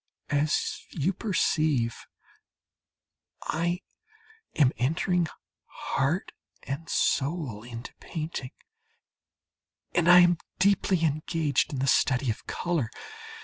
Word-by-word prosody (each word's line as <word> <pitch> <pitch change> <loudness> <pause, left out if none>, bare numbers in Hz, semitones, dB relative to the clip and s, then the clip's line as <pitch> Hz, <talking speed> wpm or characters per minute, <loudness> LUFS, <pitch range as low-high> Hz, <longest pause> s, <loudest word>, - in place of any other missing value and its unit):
As 145 +1 +1
you 165 +5 0
perceive, 155 - +1 1.5
I 175 +3 -1 0.7
am 140 -4 +5
entering 165 +6 +1 0.4
heart 140 +8 -1 0.3
and 145 +4 -5
soul 140 -7 0
into 120 +1 -8
painting, 155 -5 -5 1.4
and 175 -1 +3
I 180 0 +10
am 175 -1 +4 0.2
deeply 190 -2 +3
engaged 155 0 0
in 140 - -3
the 130 - 0
study 135 -2 +3
of 110 - -8
colour. 165 -10 -1
155 Hz, 95 wpm, -28 LUFS, 135-175 Hz, 1.5 s, I